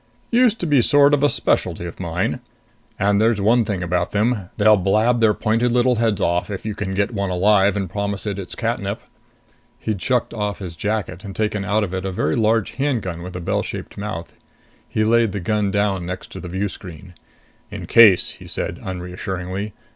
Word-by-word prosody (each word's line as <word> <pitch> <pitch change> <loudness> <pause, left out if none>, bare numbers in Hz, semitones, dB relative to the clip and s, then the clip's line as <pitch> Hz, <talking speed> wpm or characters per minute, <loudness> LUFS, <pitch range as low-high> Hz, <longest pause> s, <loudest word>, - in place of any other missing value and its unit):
Used 235 -2 +4
to - - -1
be 145 -4 +4
a - - +5
sort 145 +3 +5
of 145 0 +3
specialty 85 - 0
of 85 - -8
mine. 90 0 -2 0.6
And 100 +1 +2
there's 110 -1 +3
one 115 +4 +3
thing 100 -4 -3
about 90 0 -1
them 105 -2 0
they'll 110 +1 +6
blab 110 +5 +2
their 110 -2 +4
pointed 115 +3 +1
little 125 0 +3
heads 110 -3 +1
off 90 +1 0
if 100 -1 -6
you 110 - -2
can 95 -2 -4
get 100 +4 0
one 100 -2 -1
alive 100 +2 +3
and 95 -2 -2
promise 100 +2 -3
it 100 -2 -3
its 95 - -7
catnip...." - - -2 0.8
He'd 105 -4 -3
shucked 125 -2 0
off 105 -2 -2
his 90 -4 -7
jacket 100 -2 -3
and 100 -2 -8
taken 105 -2 -1
out 105 +2 +1
of 95 -3 -4
it 95 0 -3
a 95 - -2
very 80 -4 0
large 110 -1 +1
handgun 115 -12 -1
with 90 +1 -8
a - - -3
bell 85 - -1
shaped - - -7
mouth. 95 -5 -6 0.6
He 110 - 0
laid 115 -1 +3
the 100 - -2
gun 105 +2 0
down 95 -3 0
next 90 0 -6
to - - -8
the 90 - -7
view 95 +3 -1
screen. 90 -1 -10 0.6
"In - - -7
case," 110 -6 +6
he - - -13
said, - - -4
unreassuringly. 95 +2 -5
100 Hz, 200 wpm, -21 LUFS, 95-110 Hz, 0.8 s, they'll